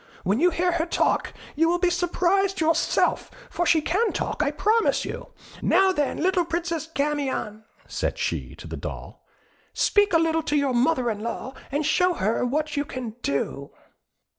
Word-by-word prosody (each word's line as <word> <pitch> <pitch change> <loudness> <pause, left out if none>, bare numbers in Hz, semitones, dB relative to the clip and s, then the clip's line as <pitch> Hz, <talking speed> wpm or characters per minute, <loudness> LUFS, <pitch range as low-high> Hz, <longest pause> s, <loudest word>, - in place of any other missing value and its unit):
When 200 +6 +1
you 355 +4 +5
hear 355 +1 0
her 340 0 -1
talk, - - +1 0.2
you 325 +2 +3
will 350 - +2
be 350 0 +2
surprised 365 +2 +1
yourself; 325 0 +1 0.2
for 350 - -1
she 320 -2 +4
can 410 +9 +1
talk, - - -2
I 295 - +2
promise 430 +9 +1
you. - - -6 0.3
Now, 385 0 +4
then, 295 -6 -1
little 370 +1 +2
Princess 335 -1 -3
Camion," 280 -8 -2 0.2
said - - -2
she, - - -3
to - - -11
the - - -6
doll, - - -8 0.5
"speak 410 -1 +3
a - - +7
little 325 0 +1
to 300 -1 -2
your 280 -3 +1
mother 245 -1 +2
in 210 - -5
law, 235 +4 -5 0.2
and 290 +2 -1
show 360 +3 +2
her 215 -1 0
what 300 +5 -1
you 285 - +1
can 255 -5 -6
do." 140 0 -2
320 Hz, 175 wpm, -25 LUFS, 275-350 Hz, 0.5 s, a